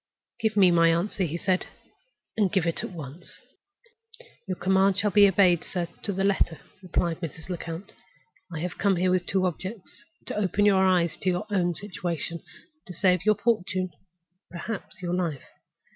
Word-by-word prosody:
"Give 220 -1 0
me 185 -3 +7
my 165 -1 +5
answer," 180 +3 0
he 165 +1 -3
said, 185 +1 0 0.7
"and 205 -4 +2
give 190 -4 +1
it 170 - -1
at - - -4
once." 170 +3 -10 1.1
"Your 185 -1 -3
commands 190 +1 +3
shall 210 - +1
be 205 +1 +7
obeyed, 180 -3 +4
sir, 175 -2 -3
to 205 - -2
the 195 0 -1
letter," 195 -5 +1 0.2
replied 175 -2 -1
Mrs. 165 0 -7
Lecount. 170 +1 -6 0.6
"I 160 -2 -4
have 180 +1 -4
come 200 -1 +3
here 180 +1 +1
with 180 -1 0
two 190 -1 +1
objects. 185 +3 -6 0.2
To - - -5
open 205 0 +1
your 195 -2 +5
eyes 175 -3 +2
to 185 - -1
your 180 +4 -1
own 175 -3 +1
situation, 170 -4 -4
and 310 - -23
to 180 - -7
save 185 -2 +2
your 215 - +6
fortune—perhaps 185 -2 -4
your 175 0 -2
life. 170 -7 -2
185 Hz, 170 wpm, -26 LUFS, 170-195 Hz, 1.1 s, me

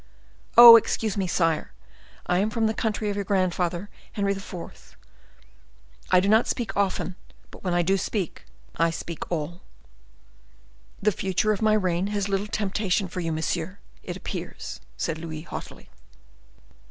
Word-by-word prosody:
Oh, 235 -1 +13
excuse 220 -1 -1
me, 195 -3 -1
sire! 165 -2 0 0.5
I 180 0 +1
am 205 +3 +1
from 225 +1 0
the 220 - +1
country 215 -1 -1
of - - -4
your 200 - -2
grandfather, 185 -1 0 0.3
Henry 200 -1 0
IV. 195 -3 -8 1.1
I 185 - +6
do 190 - 0
not 220 +3 +4
speak 235 -2 -3
often: 190 -2 -1 0.4
but - - -14
when 180 -2 0
I 175 - +3
do 190 +3 +2
speak, 195 -1 -3 0.3
I 165 0 +3
speak 165 +1 -6
all." 170 +1 -3 1.4
"The 210 - +4
future 195 +2 0
of 210 - -2
my 215 -1 +4
reign 185 -3 +1
has 205 -1 -1
little 200 +1 -1
temptation 200 -1 -1
for 180 - -5
you, 165 -2 -2
monsieur, 165 +3 -2 0.2
it - - -6
appears," - - -6 0.2
said 160 - -2
Louis, 160 -2 -6
haughtily. - - -9
190 Hz, 155 wpm, -25 LUFS, 175-210 Hz, 1.4 s, Oh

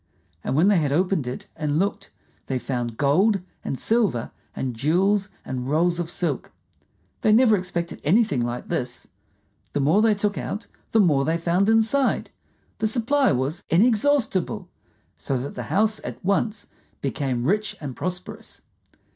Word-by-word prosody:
And - - -1
when 165 +6 +4
they 205 -2 +5
had 145 -3 0
opened 180 -3 +1
it 125 - -5
and 150 -1 -1
looked, 195 +4 -1 0.4
they 130 - -1
found 120 -3 -3
gold 190 +9 +3 0.2
and 135 - -3
silver 215 - +1 0.2
and 130 -3 -3
jewels 190 - +2 0.2
and 130 0 -4
rolls 170 +3 +2
of 170 -2 -2
silk. 165 -9 -2 0.7
They 215 - +3
never 220 0 +6
expected 175 -3 -3
anything 185 - +3
like 120 +1 -4
this. 125 0 -3 0.7
The - - 0
more 155 +9 +4
they 220 -1 +4
took 205 0 -1
out 210 +4 -4 0.3
the 225 - +4
more 150 -9 +4
they 160 +3 +1
found 175 +4 +1
inside. 225 +5 +2 0.5
The 220 - +2
supply 255 +5 +2
was 135 +6 -1
inexhaustible, 215 - +2 0.5
so 135 - -2
that 130 +3 -5
the 125 - -5
house 215 +2 +2
at - - -7
once 205 +2 0 0.4
became 135 -3 -1
rich 210 +6 0
and 140 -5 -6
prosperous. 180 +1 -5
180 Hz, 155 wpm, -24 LUFS, 140-210 Hz, 0.7 s, never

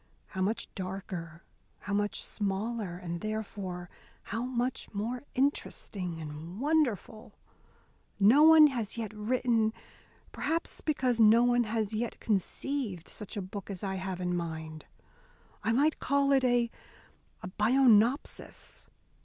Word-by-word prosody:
How 190 - -4
much 210 +5 0
darker, 185 -3 -6 0.4
how 200 - -4
much 205 0 0
smaller, 205 -2 -2
and 170 -1 -5
therefore 200 -4 -4 0.4
how 225 +2 -3
much 250 0 -2
more 235 +5 -2
interesting 200 - -1
and 160 +5 -7
wonderful. 245 - 0 0.8
No 220 +9 +7
one 315 0 +9
has 235 -7 -1
yet 220 -2 -4
written 225 0 +1 0.6
perhaps 330 +2 -2
because 255 -6 0
no 225 +2 +7
one 245 -1 +3
has 220 -1 -1
yet 230 +2 -2
conceived 215 - -2
such 210 0 -8
a 200 - -2
book 195 +2 -7
as 195 -1 -6
I 195 -1 -1
have 185 -1 -4
in 180 -1 -1
mind. 160 -2 -5 0.7
I 225 - +1
might 290 +6 +2
call 280 +1 +2
it 270 -1 +4
a 245 -2 +2 0.9
'Bionopsis. 240 +2 +2
215 Hz, 125 wpm, -30 LUFS, 190-245 Hz, 0.9 s, one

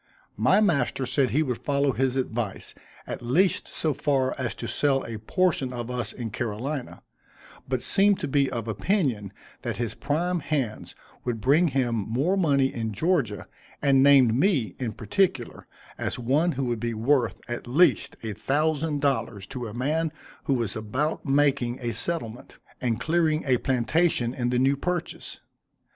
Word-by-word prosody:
My 130 - +4
master 140 - +1
said 130 +1 +2
he 150 +5 +2
would 125 -5 -3
follow 140 -1 +1
his 130 0 0
advice, 120 -5 -3 0.3
at - - -6
least 160 +11 +2
so 155 -2 -1
far 135 -2 +1
as 130 -3 -3
to - - -6
sell 140 -2 +1
a 110 -2 -6
portion 140 - 0
of 120 -1 -5
us 125 -1 -3
in 115 -4 -6
Carolina, 120 +5 -4 0.6
but 130 -1 -1
seemed 200 0 +3
to - - -1
be 140 -1 +2
of 115 -1 -4
opinion 115 - 0 0.3
that - - -3
his 120 -2 -2
prime 175 +4 -1
hands 135 -9 -3 0.3
would 120 -2 -2
bring 145 +9 +4
him 130 -4 0
more 125 - 0
money 140 -8 +2
in 110 -2 -3
Georgia, 135 - 0 0.3
and 135 -2 +4
named 135 -4 +6
me, 135 - +2
in 120 -4 -3
particular, 195 - -1 0.3
as - - -2
one 140 +8 +1
who 135 0 -2
would 120 -2 -1
be 115 0 -2
worth, 115 -1 +2
at 120 +1 -5
least, 155 +9 +3
a 110 -2 -3
thousand 150 +4 0
dollars, 115 -8 -1
to 125 -1 -6
a - - -7
man 155 +6 0 0.3
who 135 - +2
was 115 -5 -2
about 130 +9 -2
making 135 -3 +2
a 120 -2 -3
settlement, 120 -2 -2 0.3
and 120 -3 0
clearing 160 +1 +1
a 130 -2 +3
plantation 130 0 +1
in 120 -2 -1
the 125 - +1
new 135 +2 +3
purchase. 175 +4 -4
130 Hz, 165 wpm, -26 LUFS, 120-150 Hz, 0.6 s, named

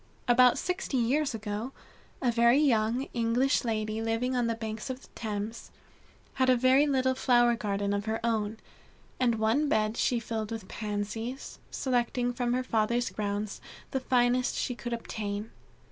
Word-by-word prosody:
About 245 0 +6
sixty 360 -6 -2
years 260 +3 +1
ago, 215 +4 -4 0.5
a 245 - +3
very 235 +2 +5
young 240 -3 +2
English 240 +4 +2
lady 215 -1 -2
living 225 +3 0
on 245 -2 +1
the 230 - 0
banks 220 +1 -5
of 260 +1 -5
the - - -16
Thames, 215 0 -5 0.6
had 260 -1 +2
a 255 - +6
little 260 +1 +3
flower 240 -2 +4
garden 200 -2 -1
of 200 0 -2
her 220 0 -1
own, 220 -2 0 0.6
and 245 -3 +3
one 225 +7 +1
bed 215 -1 +1
she 240 0 +1
filled 220 -2 -4
with 220 -4 -5
Pansies, 215 +4 -4
selecting 245 -1 0
from 245 0 -1
her 255 +1 0
father's 235 +1 0
grounds 205 0 -3 0.3
the 265 - 0
finest 250 -1 +2
she 250 - -1
could 240 0 -6
obtain. 215 -2 -4
235 Hz, 155 wpm, -29 LUFS, 220-255 Hz, 0.6 s, About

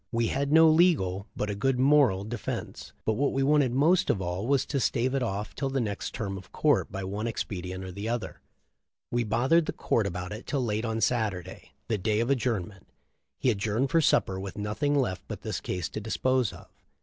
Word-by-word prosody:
We 115 -1 +1
had 140 +1 -1
no 160 +1 +7
legal, 155 - +3
but 105 0 -2
a - - -2
good 130 +5 0
moral 130 -8 +4
defense, 110 +1 -5
but 110 - +2
what 140 +6 0
we 135 - +1
wanted 145 -2 +3
most 155 +8 +3
of - - +2
all 90 +4 -3
was 140 0 +2
to 140 - -1
stave 125 0 +1
it 135 - 0
off 105 -3 -3
till 135 -1 -2
the 135 0 -1
next 105 -5 -3
term 100 -3 -3
of 95 - -16
court - - +2
by 95 - -4
one 100 +4 -3
expedient 95 -4 -4
or 95 - -6
another. 115 +3 -4 0.7
We 120 0 +1
bothered 130 +10 +2
"the - - -2
court" 110 -4 0
about 90 0 -5
it 110 +3 -7
till 135 -4 0
late 110 +1 -1
on 115 0 -2
Saturday, 110 -9 -2
the 110 -3 0
day 105 +3 +1
of 120 +4 +1
adjourn 115 -8 0
ment. 100 -3 -18 0.5
He 125 - +2
adjourned 110 +5 -1
for 165 - +4
supper 95 -9 +2
with 95 +2 -7
nothing 105 +8 -1
left 125 -10 0
but - - -6
this - - -4
case 90 -2 -3
to 110 - -5
dispose 125 +2 +1
of. - - -13
115 Hz, 210 wpm, -28 LUFS, 100-135 Hz, 0.7 s, no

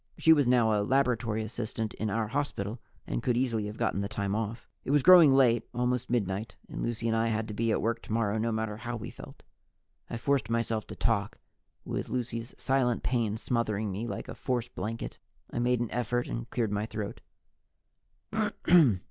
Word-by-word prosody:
She 160 - +6
was 145 -5 +3
now 120 -3 +4
a 105 - +2
laboratory 115 -2 +1
assistant 110 0 -4
in 110 - -3
our 110 +1 -1
hospital 115 -5 -2 0.3
and - - -2
could 120 -1 +1
easily 115 -5 0
have 105 +1 -7
gotten 115 -4 0
the 100 - -1
time 100 -2 -2
off. 110 +2 -3 0.2
It - - -7
was 145 -1 +4
growing 175 -5 +9
late, 125 -4 +5
almost 125 0 0
midnight, 105 -2 -1
and - - -6
Lucy 115 -1 -2
and 115 - +2
I 115 0 +2
had 110 -1 -1
to - - -4
be 115 +2 0
at - - 0
work 115 +1 0
tomorrow, 110 -1 0
no 115 +1 0
matter 110 -1 -2
how 120 +1 -4
we 110 - -6
felt. - - -12 0.7
I 115 - -3
forced 140 +3 0
myself 115 -2 -1
to - - -7
talk, 105 -3 0 0.5
with - - -3
Lucy's 120 -1 -3
silent 130 -3 +1
pain 115 -4 0
smothering 110 -3 -1
me 105 +5 -3
like - - -5
a - - -6
force 125 -2 -2
blanket. 115 +2 -5 0.3
I - - -1
made 125 0 +2
an 120 - -2
effort 120 +1 -1
and - - -5
cleared 115 -4 -1
my 105 +1 -1
throat. 105 -2 -5
115 Hz, 190 wpm, -29 LUFS, 110-125 Hz, 0.7 s, growing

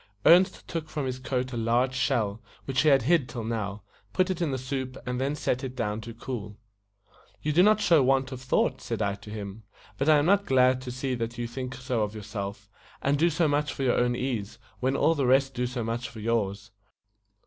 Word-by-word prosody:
Ernest 185 +3 +5
took 160 -2 -4
from 150 -3 -3
his 130 0 -3
coat 130 0 -2
a - - -3
large 120 +3 +1
shell, 115 -5 0 0.2
which 135 -1 +1
he 155 - +4
had 135 -4 +5
hid 155 -1 +2
till 120 -3 -5
now, 105 -3 -3 0.3
put 185 0 +2
it 180 - -3
in 165 - +1
the 135 - -1
soup, 130 0 -4
and 125 0 -2
then 140 +2 0
set 130 -3 -1
it 130 -1 -5
down 110 -3 -2
to 115 +1 -8
cool. 110 -3 -6 0.9
"You 150 - 0
do 175 - +6
not 210 +2 +5
show 170 -7 +5
want 135 0 +2
of 130 -1 -6
thought," 130 0 +1
said 115 -3 -2
I 100 -1 0
to 100 +1 -11
him. 105 0 -6 0.4
"But 140 +3 +2
I 155 - +7
am 145 - +2
not 200 +3 +3
glad 130 -1 +4
to 130 -1 -6
see 130 +1 -2
that 120 0 -3
you 120 - -2
think 125 +2 -5
so 125 -3 -2
of 105 0 -2
your 105 - -7
self, 100 -1 -6 0.4
and 140 +1 +3
do 170 +2 +4
so 165 0 +2
much 145 0 0
for 135 - -4
your 125 - +2
own 120 0 +2
ease, 120 -5 -3 0.2
when 130 +2 +1
all 165 - +3
the 140 -5 0
rest 135 +1 +3
do 125 0 -1
so 125 -1 -3
much 115 +2 -3
for 115 - -10
yours. 105 -2 -1
125 Hz, 235 wpm, -27 LUFS, 115-135 Hz, 0.9 s, I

